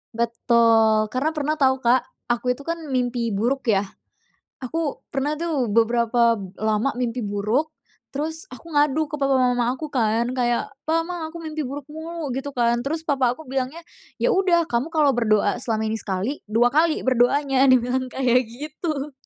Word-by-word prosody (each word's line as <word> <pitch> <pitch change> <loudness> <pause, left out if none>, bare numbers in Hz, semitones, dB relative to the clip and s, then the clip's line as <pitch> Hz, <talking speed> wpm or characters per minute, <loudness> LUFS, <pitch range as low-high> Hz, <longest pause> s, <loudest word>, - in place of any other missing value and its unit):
Betul. 230 -2 +3
Karena 280 +5 0
pernah 305 +1 0
tau, 265 -1 +4
Kak, 245 +1 +3 0.2
aku 250 +1 +1
itu 280 - -12
kan 335 +2 -3
mimpi 245 -3 -1
buruk, 245 +5 -1
ya. 200 -3 +3 0.8
Aku 295 +3 -3
pernah 280 +2 -1
tuh 305 -8 -1
beberapa 235 +1 +3 0.2
lama 215 +4 0
mimpi 245 0 -2
buruk, 210 +9 0 0.4
terus 320 +5 -4
aku 330 +6 -12
ngadu 295 0 +2
ke 300 - -4
papa 275 -1 +2
mama 245 -1 +2
aku 305 +2 -7
kan, 235 0 +1
kayak, 240 -2 0 0.2
"Pah, 325 +1 +2
Mah, 340 -2 -5
aku 330 - -9
mimpi 310 -1 -4
buruk 280 +2 -6
mulu," 320 -2 -5
gitu 270 +2 -5
kan, 235 0 +2
terus 305 +6 -3
papa 265 -6 +1
aku 315 - -12
bilangnya, 265 +3 -3 0.4
"Ya - - +3
udah, 360 -3 +3
kamu 240 +4 0
kalau 300 -3 +4
berdoa 215 -2 +1
selama 220 -3 -1
ini 225 - -1
sekali, 200 +9 -3
2 235 +3 +3
kali 315 +2 +2
berdoanya," 265 +2 +3
dia 255 -1 +7
bilang 255 +2 -1
kayak 250 -2 +1
gitu, 300 +3 -5
255 Hz, 170 wpm, -23 LUFS, 235-300 Hz, 0.8 s, dia